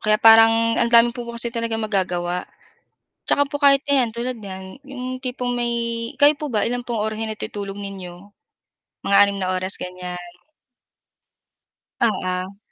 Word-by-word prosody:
Kaya 215 -1 +3
parang 225 +1 +6
ang - - +2
daming 235 0 +5
mo 240 -1 -7
po 235 - -6
kasi 235 0 -1
talagang 230 -1 -2
magagawa. 180 -4 -2 0.8
Saka 285 - +3
po 290 +1 -5
kahit 275 -1 +6
ayan, 270 -5 +2
tulad 240 +3 -4
n'yan 190 +4 -9
'yong 255 -2 -7
tipong 250 -1 -3
may 240 -1 -1 0.5
kayo 290 +1 +6
po 300 +1 -6
ba, 215 -3 0
ilan 245 +1 -2
pong 240 -2 -3
ora 215 +1 -1
natutulog 210 -2 -5
ninyo? 195 -3 -7 0.9
Mga 200 - +3
6 200 0 0
na 185 -1 -1
oras, 185 +1 -1
ganyan. 180 -1 -8 1.6
Oo. 185 -3 -1
225 Hz, 150 wpm, -21 LUFS, 190-245 Hz, 1.6 s, parang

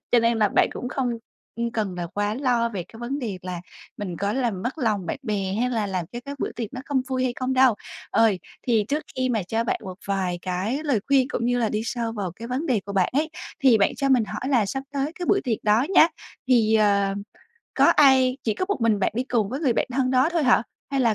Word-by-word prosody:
Cho 240 - +7
nên 230 0 +2
là 210 -2 +4
bạn - - +3
cũng 250 - -5
không, 265 -2 -1 0.5
ưm, 235 0 -1
cần 210 -5 -2
là 175 -1 -4
quá 205 +4 -2
lo 245 -3 +1
về 195 -6 -4
cái 225 - -13
vấn 265 +4 -3
đề 210 -8 -4
là 180 -2 -5 0.4
mình 185 -4 -5
có 200 +3 -1
làm 235 -8 -1
mất 260 +6 -3
lòng 210 - 0
bạn - - -3
bè 195 -3 -2
hay 250 0 +1
là 220 -4 0
làm 185 -3 -2
cho 240 - -5
cái 280 0 -6
bữa - - -2
tiệc 230 -3 -4
nó 255 - -6
không 270 -3 0
vui 255 -1 0
hay 250 - 0
không 255 0 -1
đâu. 255 -3 +5 0.4
Ờ, 225 -1 +4 0.4
thì 225 -4 +3
trước 300 +2 0
khi 255 0 +1
mà 225 -5 0
cho 225 +6 -1
bạn - - -1
một 185 -1 -7
vài 190 -3 -1
cái 190 +8 -2
lời 265 -8 +1
khuyên 275 -2 +4
cũng 235 - -2
như 245 0 +1
là 225 -2 +1
đi 215 - -1
sâu 230 -1 -2
vào 195 -5 -4
cái 230 +1 -8
vấn 260 +6 -2
đề 245 -8 +1
của 200 - -5
bạn 190 -2 +2
ấy 310 +3 0 0.3
thì 250 -5 +6
bạn 200 - +2
cho 275 - 0
mình 250 -4 +4
hỏi 255 - -5
là 240 -7 +3
sắp 270 +7 -3
tới 285 +3 -1
cái 355 - -3
bữa 395 - +3
tiệc 230 -4 0
đó 215 +6 +3
nhá, 325 - +8 0.4
thì, 225 -4 +4
ờ, 200 -2 +3 0.6
có - - +4
ai 265 -3 +5
chỉ 220 - +1
có 370 - -1
một 405 - -1
mình 225 -2 +3
bạn 200 - 0
đi 245 - 0
cùng 225 -6 0
với 265 +6 -4
người 275 -7 +2
bạn - - 0
thân 255 0 +1
đó 260 +3 +4
thôi 335 -3 +1
hả? 245 -4 +4 0.3
Hay 275 - 0
là 230 -4 +3
235 Hz, 265 wpm, -24 LUFS, 205-260 Hz, 0.6 s, nhá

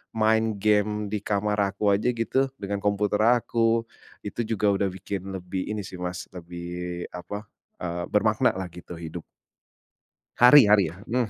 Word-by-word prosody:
main 110 0 +2
game 105 0 +1
di 105 - -1
kamar 105 0 0
aku 100 +1 0
aja 110 +5 +1
gitu, 120 +3 +1 0.2
dengan 100 0 -2
komputer 105 0 +1
aku, 115 -1 +2 0.4
itu 105 +3 -3
juga 105 0 +2
udah 100 0 0
bikin 95 0 -5
lebih 90 0 -4
ini 105 -1 -2
sih, 95 - -9
Mas, 90 0 -5
lebih 85 0 -6
apa, 100 +4 -6 0.4
eee, 85 0 -3
bermaknalah 105 -3 +1
gitu 90 +1 -11
hidup. 80 0 -7 1.1
Hari 125 +4 +9
hari 105 -2 +6
ya, 85 - -11
mmm. 120 -1 0
100 Hz, 150 wpm, -26 LUFS, 90-110 Hz, 1.1 s, Hari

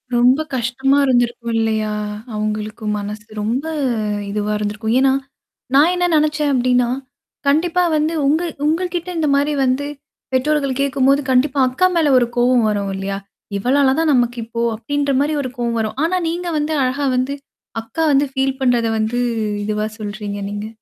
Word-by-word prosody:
ரொம்ப 250 +5 +4
கஷ்டமா 265 +3 +1
இருந்திருக்கும் 240 -2 +1
இல்லையா? 220 -1 0 0.4
அவங்களுக்கும் 215 0 -3
மனசு. 210 +1 -6 0.2
ரொம்ப 235 +6 -1 0.7
இதுவா 210 0 -1
இருந்திருக்கும். 210 +2 -2
ஏன்னா? 270 0 +4 0.6
நான் 300 +5 +6
என்ன 355 0 +1
நினச்சேன் 300 -1 +1
அப்டின்னா? 250 -1 +2 0.6
கண்டிப்பா 340 +5 +2
வந்து 305 +2 +1
உங்க 310 +4 +3 0.2
உங்க 325 +4 +1
கிட்ட 350 +1 -3
இந்த 310 -2 +1
மாரி 285 +1 +1
வந்து. 265 +3 0 0.5
பெற்றோர்கள் 275 0 +1
கேட்கும்போது 275 0 +2
கண்டிப்பா 270 +2 +2
அக்கா 370 +9 +2
மேல 310 -4 +3
ஒரு 240 -2 +3
கோவம் 245 -1 +4
வரும் 200 -2 -1
இல்லையா? 195 0 -3 0.4
இவளால 265 +5 +3
தான் 320 -2 +3
நமக்கு 245 -1 +1
இப்போ 230 0 -4
அப்படின்ற 285 +5 -1
மாரி 295 +2 +1
ஒரு 255 -2 -4
கோவம் 235 -1 -1
வரும். 220 +2 -3
ஆனா 370 +2 +1
நீங்க 350 +1 -3
வந்து 300 +1 -1
அழகா 275 +3 0
வந்து 260 +3 0 0.5
அக்கா 230 +8 -3
வந்து 280 +1 +4
ஃபீல் 265 -1 0
பண்றத 240 -3 +2
வந்து 220 +3 0 0.5
இதுவா 215 0 -1
சொல்றீங்க 205 -1 -5
நீங்க? 205 +1 -4
255 Hz, 155 wpm, -19 LUFS, 220-285 Hz, 0.7 s, நான்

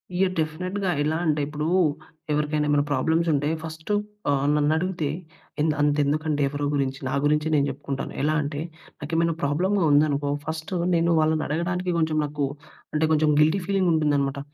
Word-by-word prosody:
Yeah! 185 0 +2
డెఫినెట్‌గా. 180 +5 -2
ఎలా 155 +2 0
అంటే, 150 -2 +1
ఇప్పుడూ 150 0 -4 0.7
ఎవరికైనా 150 0 0
ఏమన్నా 145 0 +3
ప్రాబ్లమ్సుంటే, 155 +1 +1
ఫస్టు 160 +4 -5 0.4
ఆహ్, 140 -1 +1
నన్నడుగుతే 155 +2 0 0.5
ఎంద్ 155 0 +2
అంతెందుకండి 145 +1 +1
ఎవరో 145 0 -3
గురించి, 135 -1 -1
నా - - -3
గురించే 150 +1 +2
నేను 140 -1 +3
జెప్పుకుంటాను. 135 0 -5
ఎలా 155 +1 +2
అంటే, 145 +1 -4 0.4
నాకేమైనా 165 +2 0
ప్రాబ్లమ్‌గా 180 +7 +1
ఉందనుకో, 145 -1 +2
ఫస్ట్ 160 +3 -5 0.2
నేను 170 0 +2
వాళ్ళనడగడానికి 170 +3 0
కొంచెం 160 -1 +1
నాకు 145 -1 -2 0.5
అంటే, 155 +1 +2
కొంచెం 155 0 +3
గిల్టీ 160 +5 +3
ఫీలింగుంటుందనమాట. 150 -8 +1
155 Hz, 135 wpm, -24 LUFS, 145-165 Hz, 0.7 s, ఏమన్నా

